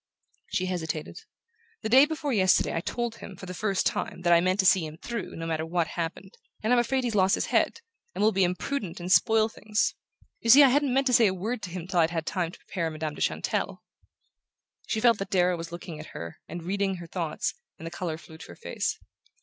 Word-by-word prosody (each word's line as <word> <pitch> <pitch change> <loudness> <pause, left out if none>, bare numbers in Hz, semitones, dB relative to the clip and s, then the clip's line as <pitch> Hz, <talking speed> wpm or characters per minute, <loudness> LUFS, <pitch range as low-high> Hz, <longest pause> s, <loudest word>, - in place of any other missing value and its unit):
She 185 - 0
hesitated. 160 -4 -4 0.6
"The 220 - -1
day 265 +5 +7
before 300 -3 -2
yesterday 190 -4 +3
I 165 - 0
told 240 +4 -3
him, 195 - -9
for 185 - -10
the 180 - -6
first 195 0 0
time, - - -2
that 175 -1 +5
I 170 - +6
meant 185 +2 +1
to - - -3
see 185 -2 +5
him 155 0 -7
through, 230 +2 -5
no 165 - -5
matter 160 -1 -1
what 165 0 -1
happened. 175 +3 -5 0.3
And 225 +3 +3
I'm 245 - +5
afraid 260 +2 +1
he's 240 -2 -1
lost 195 -2 +4
his - - -1
head, 465 - +2 0.3
and - - 0
will 215 - +5
be 195 -1 +2
imprudent 185 +2 -2
and 175 +1 -4
spoil 220 +2 +5
things. 215 -1 -1 0.5
You 230 - -3
see, 280 +5 +10
I 275 - +7
hadn't 280 +1 +2
meant 270 +2 +2
to 255 - +2
say 230 -2 +6
a 190 - 0
word 215 +6 -3
to 190 - -5
him 175 -1 -6
till 180 -1 0
I'd 160 -1 +4
had 165 -2 -3
time 170 -2 -1
to - - -13
prepare 170 -3 -3
Madame 155 -1 -4
de - - -9
Chantelle." - - -1 1.0
She 220 - -1
felt 235 -2 +4
that 195 -1 -4
Darrow 180 -2 +3
was 165 0 -7
looking 170 -2 -7
at 155 - -8
her 85 0 -7
and 170 -1 -7
reading 195 +2 -1
her 175 -1 -8
thoughts, 165 -2 -3 0.2
and 165 - -10
the 165 - -5
colour 170 -2 -4
flew 160 -1 -14
to - - -10
her 85 - -11
face. - - -3
185 Hz, 240 wpm, -27 LUFS, 165-220 Hz, 1.0 s, see